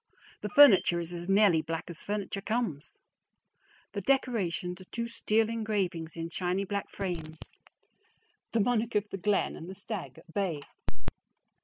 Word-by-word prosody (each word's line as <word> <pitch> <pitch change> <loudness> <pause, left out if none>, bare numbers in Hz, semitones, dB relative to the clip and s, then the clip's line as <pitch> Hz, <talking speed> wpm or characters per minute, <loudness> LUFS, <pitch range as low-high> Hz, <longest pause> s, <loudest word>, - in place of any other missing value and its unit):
The - - -3
furniture 235 - +7
is 170 +1 -4
as 175 +1 -5
nearly 195 -5 +5
black 165 +1 -3
as 170 -3 -7
furniture 200 -1 -3
comes. 215 - -2 1.0
The 200 - -2
decorations 195 -8 0
are - - -11
two 235 +5 -3
steel 225 -1 +1
engravings 200 -8 -2
in 165 0 -4
shiny 180 +2 0
black 200 0 -3
frames 165 -5 -4 1.1
the 230 - +2
"Monarch 235 +1 +1
of 210 0 +2
the 195 - -4
Glen," 205 +1 +1
and 165 - -8
the 190 - -7
"Stag 205 -5 -6
at 165 0 -16
Bay." 175 -8 -1
195 Hz, 150 wpm, -30 LUFS, 170-215 Hz, 1.1 s, furniture